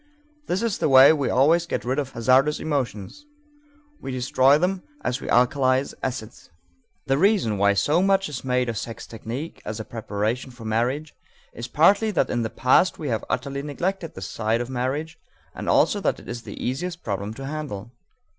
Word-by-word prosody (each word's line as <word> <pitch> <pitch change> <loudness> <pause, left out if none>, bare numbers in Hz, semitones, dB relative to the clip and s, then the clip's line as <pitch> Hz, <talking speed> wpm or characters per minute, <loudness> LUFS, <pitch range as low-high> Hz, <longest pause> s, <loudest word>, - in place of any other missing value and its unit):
This 185 +5 -1
is 230 -4 -1
the - - +1
way 135 +3 +8
we 145 -3 -1
always 165 +6 +3
get - - -3
rid 130 +3 0
of 140 -2 -4
hazardous 130 +5 +3
emotions: 145 - -3 0.7
we 135 - -6
destroy 130 +2 +3
them 180 +3 0 0.2
as 125 - -2
we - - -7
alkalize 130 +2 +2
acids. 125 -4 -5 0.6
The 135 0 +1
reason 185 - +2
why 100 0 +4
so 150 - +2
much 195 0 +2
is 145 -5 -6
made 125 -1 0
of 115 -3 -2
sex 115 - -7
technique 120 +8 -7
as 105 +1 -5
a 110 - -5
preparation 110 +2 -3
for 120 -2 -12
marriage 125 +8 -1 0.4
is 120 - -6
partly 200 - +4
that 205 - 0
in 120 - 0
the 110 - -2
past 130 +11 +3
we 150 - -4
have 110 -2 -1
utterly 140 +2 -2
neglected 165 +4 -3
this 95 0 -6
side 110 +1 -1
of 120 +2 -4
marriage 145 +6 -3 0.3
and - - -5
also - - +3
that - - 0
it - - -15
is 120 0 -5
the - - -9
easiest 170 +8 -3
problem 100 0 -3
to 135 - -7
handle. 135 -8 -6
130 Hz, 185 wpm, -24 LUFS, 120-155 Hz, 0.7 s, way